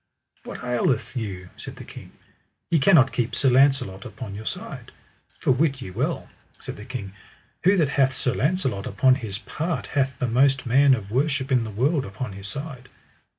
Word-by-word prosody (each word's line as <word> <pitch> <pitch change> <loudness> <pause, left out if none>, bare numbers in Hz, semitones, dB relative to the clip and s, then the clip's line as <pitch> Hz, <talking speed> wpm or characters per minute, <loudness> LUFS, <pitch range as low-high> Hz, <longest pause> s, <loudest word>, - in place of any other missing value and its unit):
What - - -8
aileth 125 0 0
you, 95 -6 -5
said - - -7
the - - -10
king, - - -11 0.6
ye 165 - +4
cannot 140 -3 +5
keep 120 0 -1
Sir 135 - +3
Launcelot 130 -7 +3
upon 110 -6 -8
your 110 +2 -7
side? - - -6 0.5
For - - +1
wit 135 +1 +2
ye 95 - -7
well, - - -2 0.3
said - - -8
the 105 - -9
king, 110 -7 -6 0.5
who 190 +4 +5
that 155 -6 +3
hath 135 -2 +2
Sir 125 - +1
Launcelot 130 - 0
upon 130 +6 +4
his 110 -7 -3
part 155 - -3
hath 135 -2 -1
the 125 - -1
most 135 +4 +3
man 135 +3 +5
of 105 -4 -8
worship 135 +2 0
in 125 -3 +3
the - - -5
world 135 - +1
upon 100 +2 -6
his 100 0 -8
side. 135 +1 -6
130 Hz, 185 wpm, -24 LUFS, 110-140 Hz, 0.6 s, cannot